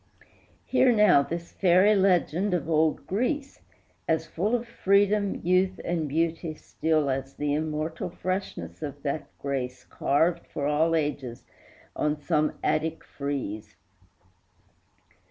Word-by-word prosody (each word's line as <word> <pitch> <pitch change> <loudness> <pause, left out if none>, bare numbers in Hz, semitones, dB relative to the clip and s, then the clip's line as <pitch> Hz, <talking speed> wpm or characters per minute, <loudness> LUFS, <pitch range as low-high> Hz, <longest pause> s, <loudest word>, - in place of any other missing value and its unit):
Hear 255 -1 +4
now 210 -10 +6
this 170 +4 -5
fairy 185 +3 +4
legend 190 -1 +2
of 170 - -3
old 160 -1 +1
Greece, 270 - -2 0.5
As 160 0 +1
full 195 +8 -1
of 240 0 -3
freedom, 200 -1 +2
youth, 185 +1 +2
and 165 -3 -1
beauty 165 +1 -1
still 155 -1 0
As 135 +1 -4
the 145 -1 -1
immortal 155 +2 -2
freshness 180 - -4
of 145 -1 -6
that 145 +1 -2
grace 130 -2 -4
Carved 160 +5 0
for 140 - -4
all 155 +3 +2
ages 145 -6 -3 0.5
on 150 0 0
some 150 +1 +1
Attic 160 +1 0
frieze. 115 -7 -5
160 Hz, 120 wpm, -27 LUFS, 145-185 Hz, 0.5 s, now